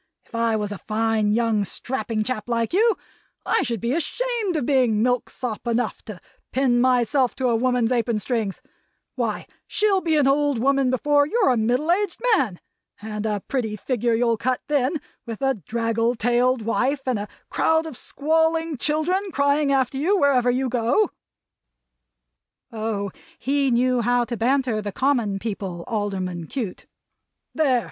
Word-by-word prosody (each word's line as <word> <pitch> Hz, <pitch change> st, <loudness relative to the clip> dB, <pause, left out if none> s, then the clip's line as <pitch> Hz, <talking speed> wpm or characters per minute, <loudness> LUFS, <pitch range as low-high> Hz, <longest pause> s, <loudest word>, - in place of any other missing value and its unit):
If -, -, -29 dB
I 230 Hz, -1 st, +1 dB
was 210 Hz, -1 st, -2 dB
a 205 Hz, -, -6 dB
fine, 220 Hz, -1 st, 0 dB
young, 225 Hz, -2 st, +2 dB
strapping 230 Hz, +1 st, -3 dB
chap 230 Hz, -1 st, -3 dB
like 230 Hz, +1 st, 0 dB
you, 445 Hz, +4 st, +3 dB, 0.5 s
I -, -, +2 dB
should 235 Hz, -2 st, -2 dB
be 235 Hz, +4 st, -1 dB
ashamed 445 Hz, +3 st, -1 dB
of 295 Hz, -6 st, 0 dB
being 245 Hz, -6 st, +2 dB
milksop 245 Hz, -1 st, -2 dB
enough 235 Hz, -1 st, -1 dB
to 210 Hz, -6 st, -8 dB, 0.3 s
pin 250 Hz, -2 st, +2 dB
myself 250 Hz, 0 st, +2 dB
to 260 Hz, -2 st, 0 dB
a 235 Hz, -, +2 dB
woman's 245 Hz, 0 st, +1 dB
apron 235 Hz, -2 st, +1 dB
strings! 215 Hz, -3 st, -2 dB, 0.5 s
Why, -, -, -2 dB, 0.2 s
she'll 410 Hz, -3 st, +2 dB
be 325 Hz, -3 st, +1 dB
an 290 Hz, -, +3 dB
old 285 Hz, 0 st, +2 dB
woman 270 Hz, +2 st, +2 dB
before 285 Hz, +3 st, +2 dB
you're 400 Hz, -, +2 dB
a -, -, +2 dB
middle 245 Hz, +8 st, +1 dB
aged 395 Hz, 0 st, 0 dB, 0.2 s
man! 220 Hz, -, -1 dB, 0.4 s
And 210 Hz, 0 st, -4 dB
a 210 Hz, -2 st, -1 dB
pretty 230 Hz, -6 st, -1 dB
figure 235 Hz, +1 st, 0 dB
you'll 230 Hz, -1 st, +2 dB
cut 255 Hz, +3 st, -1 dB
then, 290 Hz, +1 st, +1 dB, 0.3 s
with 225 Hz, -2 st, -5 dB
a 270 Hz, 0 st, +3 dB
draggle 230 Hz, +1 st, 0 dB
tailed 245 Hz, +1 st, +1 dB
wife 260 Hz, +5 st, 0 dB
and 255 Hz, -5 st, 0 dB
a 205 Hz, -, -4 dB, 0.2 s
crowd 320 Hz, 0 st, +2 dB
of 315 Hz, -5 st, -7 dB
squalling 320 Hz, +3 st, 0 dB
children 325 Hz, +9 st, 0 dB
crying 285 Hz, -1 st, +2 dB
after 270 Hz, -1 st, +1 dB
you 380 Hz, +8 st, +2 dB
wherever 270 Hz, -6 st, +3 dB
you 255 Hz, +2 st, +1 dB
go!" 245 Hz, -, +1 dB, 1.6 s
Oh, 215 Hz, -3 st, -3 dB, 0.3 s
he 275 Hz, 0 st, +1 dB
knew 250 Hz, 0 st, +2 dB
how 245 Hz, +1 st, +2 dB
to 235 Hz, -, -4 dB
banter 245 Hz, -1 st, +1 dB
the 205 Hz, -1 st, -4 dB
common 235 Hz, -4 st, +1 dB
people, 195 Hz, -5 st, -5 dB
Alderman 190 Hz, -6 st, -3 dB
Cute! 220 Hz, -, -5 dB, 0.7 s
"There! 275 Hz, -6 st, +3 dB
245 Hz, 160 wpm, -23 LUFS, 225-280 Hz, 1.6 s, you